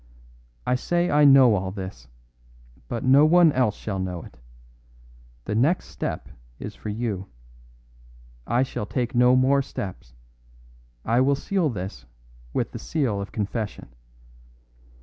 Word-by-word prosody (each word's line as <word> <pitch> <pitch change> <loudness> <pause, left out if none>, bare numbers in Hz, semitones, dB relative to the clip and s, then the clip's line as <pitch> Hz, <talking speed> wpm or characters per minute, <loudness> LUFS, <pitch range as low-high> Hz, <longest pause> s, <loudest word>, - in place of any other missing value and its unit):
I 125 - +1
say 175 +7 0
I 150 0 +5
know 135 -4 +7
all 95 -2 -1
this; 95 - -8 0.8
but 115 - -4
no 135 +3 +6
one 170 +1 +6
else 125 -6 +1
shall 95 -3 -4
know 90 -2 -4
it. - - -15 1.1
The 105 - -3
next 140 +12 +1
step - - -5 0.3
is - - -7
for - - -8
you; 105 -3 -3 1.2
I 120 +3 +2
shall 105 -5 -5
take 125 +1 -2
no 125 +1 +5
more 135 +2 +3
steps; 75 - -7 0.9
I 115 +3 +3
will 140 +2 +3
seal 180 +2 0
this 90 - -6 0.4
with - - -2
the - - -7
seal 125 -11 -1
of 100 - -7
confession. 105 - -4
120 Hz, 135 wpm, -24 LUFS, 100-135 Hz, 1.2 s, know